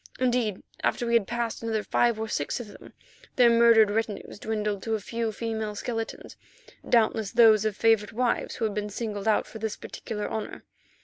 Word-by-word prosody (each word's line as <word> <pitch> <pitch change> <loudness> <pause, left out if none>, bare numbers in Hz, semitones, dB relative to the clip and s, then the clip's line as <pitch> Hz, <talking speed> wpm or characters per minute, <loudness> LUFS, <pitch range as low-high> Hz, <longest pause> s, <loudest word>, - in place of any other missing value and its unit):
Indeed, 245 -6 0 0.2
after 240 - 0
we 235 - -1
had 230 -5 +3
passed 235 -1 -3
another 220 -2 -1
five 235 -2 +1
or 220 - -2
six 145 -2 -2
of 235 -3 -8
them, - - -14 0.4
their 240 -2 +6
murdered 230 -2 +6
retinues 215 -1 -3
dwindled 210 -2 -2
to 225 +1 -1
a - - -2
few 230 +2 -3
female 220 -1 -4
skeletons, 225 +1 -5 0.5
doubtless 220 -3 +2
those 220 -3 +6
of 210 -2 -1
favourite 225 -2 +3
wives 245 +2 -1
who 230 - -1
had 215 - -1
been 210 0 -3
singled 210 -1 -4
out 215 - +3
for 220 - -10
this 220 -1 -3
particular 210 -2 -6
honour. 220 - -5
220 Hz, 185 wpm, -27 LUFS, 210-235 Hz, 0.5 s, their